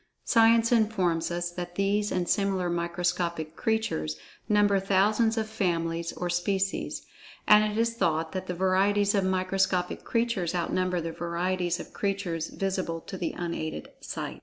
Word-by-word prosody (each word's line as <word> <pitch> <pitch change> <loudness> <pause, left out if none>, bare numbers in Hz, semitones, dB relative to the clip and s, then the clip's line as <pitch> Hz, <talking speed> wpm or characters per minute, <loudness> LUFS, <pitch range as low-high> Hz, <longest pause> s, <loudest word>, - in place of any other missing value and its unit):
Science 230 0 +5
informs 190 -8 +2
us 175 0 -2
that 175 0 -6
these 205 +2 +1
and 180 -1 -1
similar 190 -3 +1
microscopic 170 -2 -2
creatures, 80 - -1 0.3
number 205 -1 +4
thousands 210 +4 +2
of 220 -1 0
families 170 -5 -1
or 180 - -3
species,—and 195 +3 0
it 210 - -4
is 230 0 +2
thought 160 -7 0
that 185 0 -4
the 180 - -3
varieties 200 +3 +2
of 200 -2 +2
microscopic 185 -1 0
creatures 230 -7 0
outnumber 180 +1 0
the 165 0 -4
varieties 175 +1 -1
of - - -9
creatures 195 -5 -2
visible 185 -4 -2
to 190 - -9
the 175 -3 -3
unaided 160 - -4
sight. - - -6
185 Hz, 140 wpm, -28 LUFS, 170-205 Hz, 0.3 s, Science